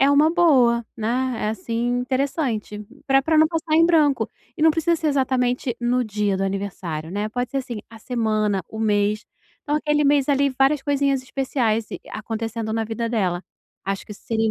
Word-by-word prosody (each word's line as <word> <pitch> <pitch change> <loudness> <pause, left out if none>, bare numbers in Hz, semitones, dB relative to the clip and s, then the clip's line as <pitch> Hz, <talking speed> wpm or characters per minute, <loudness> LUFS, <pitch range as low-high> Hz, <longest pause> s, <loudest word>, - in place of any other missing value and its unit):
é 275 +1 +5
uma 300 +3 +5
boa, 255 -9 +4
né, 245 +3 -1
é, - - +1
assim, 230 +4 -1
interessante, 255 -5 -1 0.3
pra 270 0 +5
pra 315 +3 +1
não 310 0 +6
passar 320 -1 -1
em 330 - +6
branco. 310 -5 +3 0.3
E 310 - -3
não 320 - +7
precisa 330 +2 +1
ser 315 -1 -1
exatamente 255 -3 0
no 245 +1 +1
dia 205 -2 -1
do 195 - -2
aniversário, 180 -5 -4
né, 205 +2 -2
pode 245 +2 -3
ser, 275 - -1
assim, 245 -4 -5
a 225 - -12
semana, 215 -4 0
o 220 - -7
mês. 210 0 +1 0.4
Então, 295 +1 0
aquele 300 -1 +1
mês 285 -1 +3
ali, 280 0 +3
várias 275 +2 +4
coisinhas 280 -2 +1
especiais 245 -5 -1 0.2
a-acontecendo 225 0 -4
na 225 0 0
vida 230 +1 -3
dela, 185 -6 0 0.4
acho 195 0 -3
que 210 - -8
isso - - -15
seria 225 -1 +1
245 Hz, 185 wpm, -22 LUFS, 215-280 Hz, 0.4 s, não